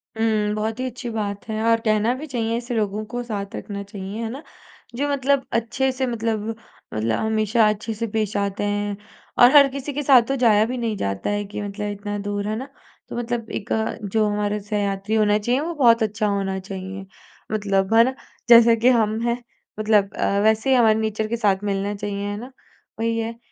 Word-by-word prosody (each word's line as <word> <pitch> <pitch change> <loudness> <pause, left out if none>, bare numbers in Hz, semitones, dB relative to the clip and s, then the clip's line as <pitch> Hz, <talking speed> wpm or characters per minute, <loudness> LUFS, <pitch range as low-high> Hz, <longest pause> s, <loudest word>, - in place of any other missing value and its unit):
उम, 215 -2 +1
बहुत 220 +2 -2
ही 255 - -1
अच्छी 245 0 -7
बात 205 -2 -4
है 220 0 -2
और 230 0 +4
कहना 215 +2 +2
भी 280 +4 -7
चाहिए 230 -4 -1
ऐसे 240 +1 -5
लोगों 210 -1 -1
को, 240 +3 -4
साथ 200 -4 -5
रखना 200 -1 -6
चाहिए, 200 +1 -7
है 225 - -3
ना? 270 +6 -7 0.5
जो 285 +4 -1
मतलब 280 -1 +1
अच्छे 235 +4 0
से 260 0 -2
मतलब, 225 -2 -2 0.5
मतलब 110 +1 0
हमेशा 220 0 +2
अच्छे 215 +2 -3
से 230 +2 -3
पेश 215 -1 -2
आते 200 0 -1
हैं, 205 0 -1 0.4
और 245 +1 +8
हर 280 -1 +9
किसी 275 +1 -5
के 295 +2 -2
साथ 265 -3 +7
तो 270 - 0
जाया 215 -2 +5
भी 250 +3 -3
नहीं 230 -3 -1
जाता 100 - -2
है 205 0 -1
कि 205 +1 -6
मतलब 205 +1 -4
इतना 205 0 -5
दूर, 205 0 -3
है 215 - -1
ना। 260 +5 -6 0.4
तो - - -5
मतलब 235 -1 -3
एक 200 - -5 0.4
जो 220 -1 +3
हमारे 205 0 -1
सहयात्री 205 0 -2
होना 210 -1 +3
चाहिए, 240 +5 +1
वो 340 +2 -3
बहुत 235 -6 +4
अच्छा 215 0 -1
होना 195 -1 -1
चाहिए। 190 0 -7 0.5
मतलब, 200 -1 0
है 225 +1 +7
ना? 260 +2 -1 0.3
जैसे 235 0 +8
कि 230 +3 +3
हम 220 -3 +2
हैं, 235 +1 -1 0.4
मतलब 210 -2 +2
अ, 200 - 0
वैसे 220 +3 +2
ही 265 - +5
हमारे 220 -3 +4
नेचर 220 0 -1
के 235 +2 -2
साथ 200 -3 +1
मिलना 200 0 -1
चाहिए, 200 0 -4
है 205 0 -3
ना? 250 +4 -9 0.5
वही 230 0 0
है। 230 +1 -4
215 Hz, 205 wpm, -22 LUFS, 205-235 Hz, 0.5 s, हर